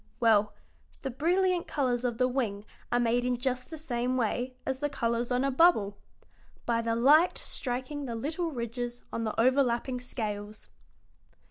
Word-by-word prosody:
Well, 215 -3 +4 0.5
the 270 - -2
brilliant 350 +6 +1
colors 250 -4 0
of 240 -2 -1
the 255 - +3
wing 225 -6 -2 0.3
are 245 - +3
made 240 +1 +2
in 250 0 0
just 250 0 -2
the 320 - -7
same 255 -4 -1
way 250 +2 -1
as 265 -1 -2
the 290 +1 -1
colors 235 -2 -1
on 250 +1 +2
a 275 - +1
bubble: 255 - +4 0.7
by 230 -1 +1
the 230 0 0
light 295 +9 +5
striking 260 +3 -3
the 235 -3 -4
little 315 +8 -2
ridges 240 -2 -5
on 230 - -2
the 215 - -3
overlapping 250 0 +2
scales." 215 -4 -5
245 Hz, 160 wpm, -29 LUFS, 235-275 Hz, 0.7 s, light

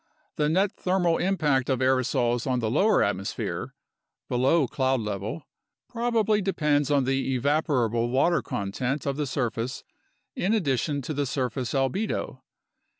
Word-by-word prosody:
The 150 0 +1
net 190 +5 +2
thermal 180 -2 +1
impact 150 -9 +1
of 130 - +2
aerosols 125 -2 +1
on 130 -1 +1
the 110 -3 -1
lower 200 - +4
atmosphere 100 -1 -3 0.5
(below 135 +5 +3
cloud 130 +1 0
level) 105 - -4 0.4
prob 240 0 -2
ably 215 -1 +3
depends 150 -7 +1
on 140 -2 +3
the 135 0 0
evaporable 125 -5 +1
water 140 +7 +2
content 125 +8 -3
of 140 -1 -1
the 150 0 -2
surface 125 -1 -2 0.5
in 205 +5 +1
addition 145 - 0
to 155 - -4
the 145 -1 -1
surface 125 0 -2
albedo. 135 - -1
135 Hz, 140 wpm, -26 LUFS, 125-160 Hz, 0.5 s, lower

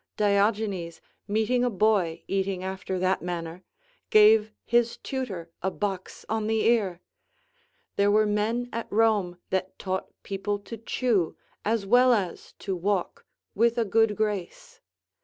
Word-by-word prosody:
Diogenes, 200 -4 +1 0.3
meeting 220 +4 +1
a 250 - +2
boy 200 -5 +1
eating 190 -1 -1
after 190 0 -4
that 185 +1 +1
manner, 175 0 -5 0.5
gave 215 0 +6
his 235 -1 +2
tutor 195 -11 -5
a 190 - 0
box 190 -1 -4
on 220 -1 -1
the 220 0 +1
ear! 200 -7 +2 1.0
There 200 0 +4
were 215 +1 +4
men 215 +4 0
at 230 - -4
Rome 205 -5 +2
that 190 0 -2
taught 190 -1 -3 0.2
people 205 +1 -2
to 205 +3 -9
chew, 225 -6 0 0.3
as 215 -1 0
well 245 +4 +5
as 190 -6 -3
to 195 -2 -4
walk, 185 +1 -2 0.3
with 230 +2 +2
a 230 - +2
good 225 0 +2
grace. 210 -4 -3
205 Hz, 140 wpm, -26 LUFS, 190-225 Hz, 1.0 s, gave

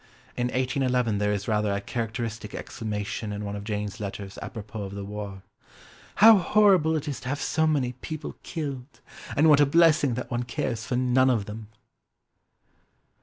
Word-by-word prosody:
In 120 0 0
1811 125 -3 0
there 105 0 +1
is 100 -1 -2
rather 105 -2 +1
a 100 - 0
characteristic 115 0 -4
exclamation 105 -1 -4
in 105 0 -4
one 100 0 -4
of 100 - -6
Jane's 105 0 -4
letters 100 -1 -6
apropos 110 -2 -7
of 100 0 -6
the 100 -1 -5
war: 100 -2 -7 0.7
"How 220 -1 +8
horrible 185 -5 +4
it 155 0 -3
is 145 - -3
to 125 - -6
have 145 +1 -2
so 160 +2 +1
many 140 -5 +1
people 150 +4 -7
killed! 140 -5 -6 0.4
And 155 +3 +5
what 150 -2 +7
a 145 - +6
blessing 155 -4 +4
that 125 - -5
one 120 0 0
cares 120 -1 -3
for 125 - -1
none 130 +1 +3
of 115 -5 +1
them!" 105 +1 -8
120 Hz, 170 wpm, -26 LUFS, 105-140 Hz, 0.7 s, How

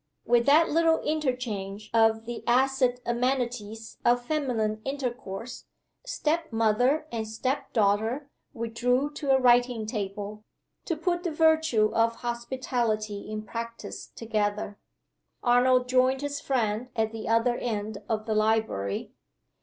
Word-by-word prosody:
With 240 +1 +3
that 310 +4 +6
little 325 +1 +3
interchange 235 -9 -3
of 225 0 +3
the 240 0 -6
acid 255 0 +2
amenities 235 -3 -2
of 245 0 +3
feminine 235 -8 -1
intercourse, 250 -5 -5 0.4
step 325 - -1
mother 230 +7 +2
and 225 -2 -3
step 260 +6 -2
daughter 220 +6 +1 0.2
withdrew 245 +4 0
to 290 -1 -5
a 265 - +6
writing 245 -2 +3
table, 210 -1 -5 0.4
to 335 - -1
put 345 +2 0
the 350 - -2
virtue 315 -9 +3
of 230 0 +2
hospitality 235 -4 -2
in 215 0 -4
practice 230 +2 -6
together. 210 -2 -2 0.6
Arnold 250 +1 +4
joined 255 +1 +3
his 285 0 -3
friend 235 -2 -1
at 220 -1 0
the 225 -1 -6
other 230 +2 +3
end 215 -3 -3
of 215 -1 -1
the 220 - -1
library. 215 - 0
235 Hz, 125 wpm, -27 LUFS, 220-260 Hz, 0.6 s, that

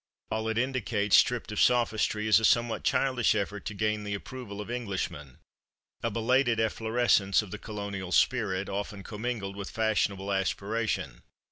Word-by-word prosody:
All 110 0 -1
it 110 - -1
indicates, 115 -5 +1
stripped 120 -3 +3
of 105 - 0
sophistry, 110 -3 +2
is 110 0 +6
a - - -6
somewhat 120 +1 +2
childish 130 -5 +2
effort 105 -1 -3
to 105 - -4
gain 105 0 0
the 105 0 -3
approval 105 -1 -8
of 105 +3 -6
Englishmen 95 - -4 0.6
a 115 - 0
belated 120 +2 +2
efflorescence 110 -2 +2
of 100 - -11
the 105 - -6
colonial 100 -3 -5
spirit, 100 -5 +2
often 100 0 -4
commingled 105 -2 -4
with 100 -1 -6
fashionable 105 -3 0
aspiration. 100 +3 -2
105 Hz, 150 wpm, -29 LUFS, 100-115 Hz, 0.6 s, is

